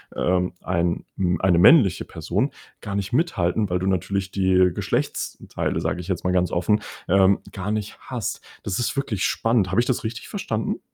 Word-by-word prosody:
ähm, 90 0 +1
ein, 85 -1 -1
hm 90 -3 0
eine 90 -2 +4
männliche 100 - +6
Person - - -2 0.3
gar 100 - -5
nicht 100 +4 -3
mithalten, 105 - +1
weil 90 0 0
du 95 - -2
natürlich 95 +1 -1
die 95 -1 +3
Geschlechtsteile, - - -2
sage 90 - -2
ich 90 - -10
jetzt 90 -3 -2
mal 90 - +1
ganz 90 -1 +2
offen, 105 +5 +1 0.3
ähm, 95 +1 +5
gar 100 +2 -4
nicht 105 -2 -3
hast. - - -4 0.2
Das 95 - -2
ist 120 - -1
wirklich 130 -8 -1
spannend. 115 -5 +1
Habe 110 - +2
ich - - -1
das 130 - 0
richtig 110 0 -5
verstanden? - - -3
95 Hz, 180 wpm, -23 LUFS, 90-105 Hz, 0.3 s, männliche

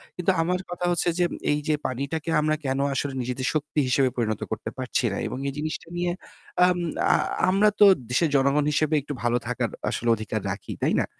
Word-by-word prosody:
কিন্তু 180 +1 +1
আমার 180 +2 0
কথা 175 0 -3
হচ্ছে 175 0 +1
যে 175 - +4 0.3
এই 150 - +1
যে 155 - +3
পানিটাকে 140 +6 -3
আমরা 155 0 +2
কেন 135 +1 0
আসলে 135 0 -2
নিজেদের 125 +1 -2
শক্তি 150 0 -1
হিসেবে 130 0 +3
পরিণত 110 -3 -1
করতে 110 - -3
পারছি 130 -1 -1
না? 100 - -3
এবং - - -5
এই 135 - -2
জিনিসটা 155 +1 -4
নিয়ে 175 0 0 0.6
আম 180 -1 +2 0.4
আ - - +5 0.3
আমরা 200 +3 +4
তো 205 - +9 0.2
দেশের 155 +6 +2
জনগণ 140 +2 +3
হিসেবে 155 +1 +1
একটু 145 +1 -6
ভালো 120 0 +2
থাকার 125 - -1 0.2
আসলে 120 - -1
অধিকার 110 -1 -4
রাখি, - - -6
তাই - - +2
না? - - +1
145 Hz, 200 wpm, -25 LUFS, 130-165 Hz, 0.6 s, তো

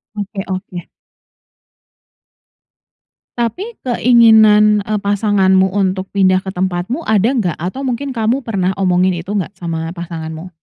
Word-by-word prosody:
Oke 205 -1 -5
oke. 185 -2 -6 2.5
Tapi 360 - -3
keinginan, 220 -4 +5
eee, 210 +1 -2
pasanganmu 200 -2 +2
untuk 190 -1 -1
pindah 185 -1 +2
ke 195 - -7
tempatmu 185 - -3
ada 215 +1 +2
nggak? 180 -7 0
Atau 260 +10 -4
mungkin 260 +3 -3
kamu 240 +1 -1
pernah 190 -5 -1
omongin 185 0 +2
itu 175 +2 -7
enggak 190 +1 -4
sama 165 -2 -5
pasanganmu? 165 0 -7
195 Hz, 120 wpm, -16 LUFS, 185-220 Hz, 2.5 s, keinginan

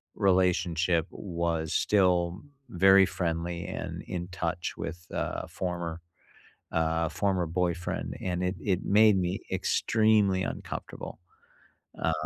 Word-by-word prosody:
relationship 90 -3 +2
was 85 -3 -2
still 90 -2 +2 0.3
very 95 +1 +6
friendly 85 0 -2
and - - -5
in 90 -1 -4
touch 90 -1 -3
with 85 +1 -6
a - - -3
former 85 -2 -4 0.7
uh, 80 0 +1
former 95 +2 0
boyfriend, 85 +1 -2
and 90 -1 -1
it 90 +1 -1
it 95 -3 0
made 105 -1 +6
me 90 0 -1
extremely 105 -4 +2
uncomfortable. - - -6 0.8
Um, 80 - +2
90 Hz, 110 wpm, -28 LUFS, 85-95 Hz, 0.8 s, very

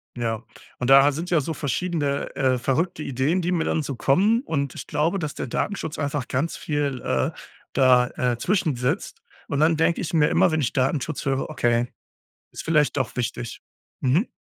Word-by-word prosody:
Ja, 115 -2 -2 0.4
und 125 - -1
da 135 +1 +7
sind 165 +5 -5
ja 170 -4 +3
so 160 +4 -3
verschiedene, 145 -1 -2
äh, 130 -2 +2
verrückte 150 +7 -1
Ideen, 140 +8 0
die 175 +1 -1
mir 170 -2 +1
dann 160 - 0
so 140 -1 -4
kommen. 200 - +3
Und 140 - -2
ich - - -7
glaube, 165 +6 0
dass 150 -3 -4
der - - -4
Datenschutz 160 - -3
einfach 145 -3 -2
ganz 140 +6 -1
viel, 145 -4 -2
äh, - - 0 0.4
da 125 -2 +5
äh, 125 -2 0
zwischen 170 - +1
sitzt. 125 +1 -2 0.3
Und 140 - -1
dann 160 +1 +4
denke 165 +1 +2
ich 170 - -4
mir 155 -2 +4
immer, 170 - +3
wenn 155 0 +1
ich 125 - -1
Datenschutz 135 +1 -1
höre: 135 -1 -1
„Okay, 120 -5 +1 0.6
ist - - -7
vielleicht 150 -4 +2
doch - - -1
wichtig.“ 120 -1 -3 0.4
Mhm. 145 - +2
145 Hz, 185 wpm, -24 LUFS, 130-160 Hz, 0.6 s, da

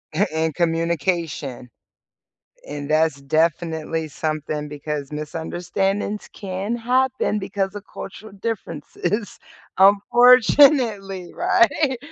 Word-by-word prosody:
a 205 -2 +1
and 160 -1 -1
communication, 165 -5 -1 1.0
and 145 0 -6
that's 155 -2 +2
definitely 160 +1 0
something 155 0 -3
because 150 -1 -5
misunderstandings 175 +7 -3
can 195 +3 -4
happen 250 -2 0
because 195 -1 -3
of 205 -1 -8
cultural 205 +2 -9
differences, 200 -1 -4 0.4
unfortunately, 220 - +5
right? 345 -7 +2
185 Hz, 85 wpm, -22 LUFS, 155-210 Hz, 1.0 s, unfortunately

